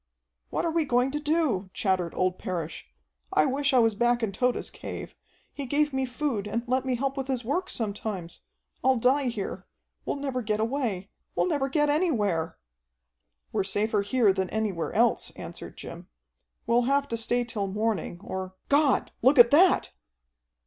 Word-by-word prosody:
"What - - -1
are 335 - +1
we 330 0 +2
going 250 -1 +2
to 295 - -2
do?" 295 - 0
chattered 185 -4 0
old 185 0 0
Parrish. 170 -6 -4 0.4
"I 155 - +4
wish 280 - +1
I 260 - +4
was 225 -2 +4
back 240 +2 +2
in 215 - 0
Tode's 250 +5 -1
cave. - - -7 0.4
He 280 -2 -5
gave 295 +2 +1
me 265 0 0
food 245 -5 -2
and 230 +3 -2
let 255 +2 0
me 255 -1 +1
help 270 +2 -1
with 270 -2 -3
his 255 -3 -2
work 355 +9 -1
sometimes. 205 -5 -4 0.4
I'll 260 0 +4
die 265 +4 +3
here. 220 -5 -4 0.4
We'll - - -2
never 275 -3 -2
get 215 -1 -1
away. 220 -5 -2 0.2
We'll - - +2
never 285 -5 0
get 295 +1 +2
anywhere." 220 - +1 0.9
"We're - - +1
safer 205 +2 0
here 205 0 +3
than 190 -1 -1
anywhere 210 -6 -2
else," - - +2
answered - - -9
Jim. - - -9 0.6
"We'll 235 +1 +3
have 280 0 +2
to 230 - -1
stay 240 +2 0
till 225 -4 -3
morning, 200 -3 -2
or 190 -1 -5
God, 285 -1 +3
look 265 +4 +5
at 235 -1 +9
that!" 350 +6 +5
240 Hz, 170 wpm, -27 LUFS, 205-275 Hz, 0.9 s, at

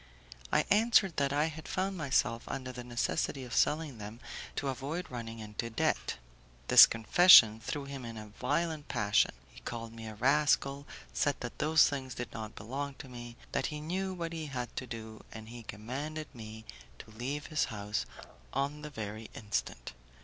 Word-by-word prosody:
I - - +3
answered 210 -3 +4
that 140 -1 +2
I 145 +2 +2
had 160 -1 -6
found 190 +1 -1
myself 130 -7 +1
under 130 -1 -4
the 125 -1 -7
necessity 120 +2 -1
of 125 - -8
selling 150 -5 +1
them 105 +3 -8 0.4
to 140 - -1
avoid 140 +7 -3
running 115 -2 -6
into 110 +1 -5
debt. 115 - 0 0.5
This - - +11
confession 115 -2 +8
threw 140 +5 -4
him 140 -2 -7
in 115 -1 -7
a 105 -1 -8
violent 150 +7 -1
passion; 105 -4 +3 0.2
he - - -13
called 115 -1 -6
me 115 -1 -8
a 110 - -7
rascal, 140 +2 +2 0.3
said 145 -2 +1
that 120 - -6
those 155 +1 +5
things 130 -3 -4
did 120 - -5
not 110 -1 -6
belong 135 +6 -4
to 135 - -10
me, 120 -1 -9
that - - 0
he 150 - -5
knew 185 +5 -2
what 170 -2 -4
he 160 -2 -4
had 125 -3 -5
to 125 - -3
do, 110 -2 -8
and 110 0 -9
he 120 0 -8
commanded 140 +10 -6
me 110 -2 -9 0.3
to - - -12
leave 135 +7 -4
his 155 -2 +1
house 105 - -3 0.5
on 140 +3 -1
the 150 - -6
very 110 -4 -6
instant. 105 - -3
130 Hz, 180 wpm, -32 LUFS, 115-150 Hz, 0.5 s, This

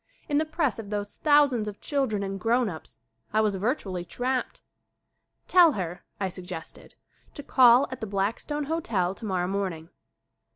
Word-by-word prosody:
In 290 -1 +2
the 315 - +1
press 310 -5 -1
of 210 -3 -7
those 205 -1 -3
thousands 285 -7 +3
of 205 -1 -6
children 260 -9 -1
and 195 0 -4
grown 235 +3 +2
ups 160 -3 -9 0.4
I 215 - +4
was 210 -2 +1
virtually 195 -3 -2
trapped. 250 +8 -3 0.8
"Tell 345 -4 +6
her," 180 -3 -4 0.2
I 195 - 0
suggested, 180 -2 -9 0.4
"to 290 - -7
call 250 0 +6
at 260 - -7
the 220 - -3
Black 200 +2 -1
stone 295 0 -3
Hotel 230 - -1
tomorrow 190 -4 -2
morning." 180 -4 -3
215 Hz, 160 wpm, -27 LUFS, 190-270 Hz, 0.8 s, Tell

